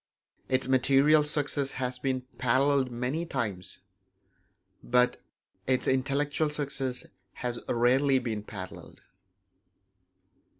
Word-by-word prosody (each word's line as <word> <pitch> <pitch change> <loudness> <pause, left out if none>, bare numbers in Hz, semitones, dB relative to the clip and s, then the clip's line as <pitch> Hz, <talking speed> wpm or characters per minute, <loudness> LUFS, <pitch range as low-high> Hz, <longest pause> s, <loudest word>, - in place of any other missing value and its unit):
Its 130 0 0
material 135 +4 +4
success 145 -2 +1
has 125 -1 -3
been 130 0 -1 0.2
paralleled 130 +2 +2
many 125 +7 -2
times; 105 - -4 1.1
but 125 0 +2 0.5
its 130 -1 +1
intellectual 140 +3 +1
success 135 -3 -3 0.3
has 120 -1 -3
rarely 130 +3 +3
been 115 -4 -3
paralleled. 95 -3 -10
130 Hz, 90 wpm, -28 LUFS, 125-140 Hz, 1.1 s, material